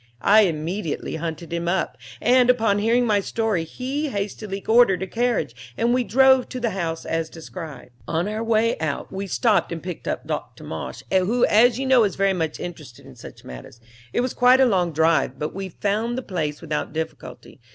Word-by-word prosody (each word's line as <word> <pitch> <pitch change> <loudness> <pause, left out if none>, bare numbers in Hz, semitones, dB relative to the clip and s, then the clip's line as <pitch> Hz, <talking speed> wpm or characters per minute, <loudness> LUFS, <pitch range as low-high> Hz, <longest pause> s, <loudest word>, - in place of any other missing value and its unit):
I 215 +1 +6
immediately 165 0 -3
hunted 165 0 -5
him 170 0 -2
up, 180 +2 0 0.2
and, 250 0 +4
upon 220 -5 +3
hearing 235 +3 +2
my 210 -3 +3
story 210 -3 -1
he 270 - -3
hastily 200 -2 -4
ordered 220 -5 +4
a - - -1
carriage 180 - -2
and 235 +1 +2
we 250 0 +2
drove 265 +2 +4
to 255 - -5
the 235 -2 -1
house 165 -4 -3
as 165 0 -2
described. 160 -5 -9 0.2
"On 170 +3 -1
our 215 +2 -3
way 225 -1 +1
out 155 -2 -3
we 195 +1 -4
stopped 215 +1 +1
and 165 -1 -5
picked 180 -1 -7
up - - -3
Dr. - - -5
Marsh, - - -6
who 195 +6 +3
as 235 +2 +4
you 270 - -2
know 260 -3 +5
is 200 -4 0
very 195 0 +2
much 160 -4 -2
interested 150 -9 -9
in - - -13
such - - -12
matters. 65 - -10 0.3
It - - +1
was 250 0 -2
quite 250 +1 +5
a 265 - +6
long 185 -7 +1
drive, 160 -4 +2
but 150 +1 -4
we 195 0 -5
found 215 +6 -1
the 260 - -3
place 155 -8 -3
without 150 -3 -3
difficulty. 160 -5 -7
195 Hz, 195 wpm, -23 LUFS, 165-235 Hz, 0.3 s, I